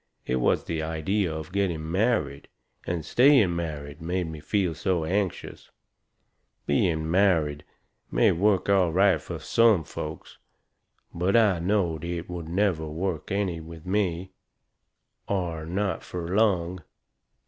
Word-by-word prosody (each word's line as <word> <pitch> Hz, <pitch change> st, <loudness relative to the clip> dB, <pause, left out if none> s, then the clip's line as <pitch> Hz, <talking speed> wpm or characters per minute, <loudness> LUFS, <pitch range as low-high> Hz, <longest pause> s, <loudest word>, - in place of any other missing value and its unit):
It 65 Hz, -, 0 dB
was 60 Hz, -, +2 dB
the 80 Hz, -1 st, -3 dB
idea 80 Hz, +4 st, -1 dB
of 80 Hz, 0 st, -6 dB
getting 85 Hz, -5 st, -1 dB
married, 90 Hz, -, 0 dB, 0.4 s
and 85 Hz, -3 st, -2 dB
staying 120 Hz, -, +5 dB
married, 75 Hz, -2 st, -5 dB
made 90 Hz, +2 st, -1 dB
me 80 Hz, -1 st, -7 dB
feel 90 Hz, +3 st, 0 dB
so 85 Hz, +1 st, -1 dB
anxious. 95 Hz, +2 st, -3 dB, 1.0 s
Being 80 Hz, +1 st, +1 dB
married 85 Hz, -6 st, +2 dB, 0.5 s
may -, -, +3 dB
work 95 Hz, +2 st, +2 dB
out 100 Hz, -, +4 dB
all 85 Hz, -2 st, +1 dB
right 95 Hz, +2 st, +3 dB
fur -, -, -6 dB
some 115 Hz, -7 st, +3 dB
folks. 75 Hz, +1 st, -8 dB, 0.7 s
But 90 Hz, +4 st, 0 dB
I 105 Hz, -6 st, +4 dB
knowed 85 Hz, -3 st, 0 dB
it 85 Hz, 0 st, -4 dB
never 85 Hz, 0 st, -1 dB
would -, -, -7 dB
work 85 Hz, -3 st, -3 dB
any 95 Hz, -4 st, -1 dB
with 80 Hz, +1 st, -11 dB
me. 95 Hz, -2 st, -1 dB, 1.0 s
Or 85 Hz, -5 st, -2 dB
not 95 Hz, +3 st, -1 dB
fur 85 Hz, -2 st, -6 dB
long. 90 Hz, -5 st, +1 dB
85 Hz, 135 wpm, -26 LUFS, 80-100 Hz, 1.0 s, staying